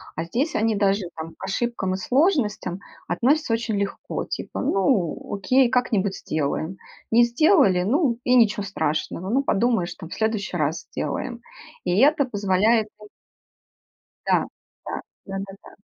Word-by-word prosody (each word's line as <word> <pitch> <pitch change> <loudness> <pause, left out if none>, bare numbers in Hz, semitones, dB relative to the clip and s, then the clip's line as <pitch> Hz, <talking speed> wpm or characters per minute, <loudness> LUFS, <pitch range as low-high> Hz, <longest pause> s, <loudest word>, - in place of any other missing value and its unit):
А 160 - -2
здесь 250 - -1
они 220 0 +2
даже 200 0 +2
там 160 0 -7
к - - -12
ошибкам 195 -2 -1
и - - -1
сложностям 225 - +1 0.3
относятся 255 - +1
очень 225 -1 -1
легко, 200 0 -3
типа: - - -5
"Ну, 195 - 0
окей, 255 +5 +3
как-нибудь 210 -6 +1
сделаем". 155 +4 -2 0.3
Не 235 +1 +6
сделали, 235 - +4
ну, 250 - +2
и 250 0 +3
ничего 210 -4 +4
страшного, 170 0 -2
ну, 270 +4 +2
подумаешь 225 -6 +1
там, 165 -4 -10
в - - -7
следующий 220 -5 -1
раз 155 +2 -1
сделаем. - - -4 0.4
И 175 - 0
это 285 +1 +5
позволяет 210 0 +2 1.4
Да - - +4 0.5
да - - -5 0.3
да 195 0 -4
да 195 - -11
да. - - -14
210 Hz, 145 wpm, -24 LUFS, 185-245 Hz, 1.4 s, Не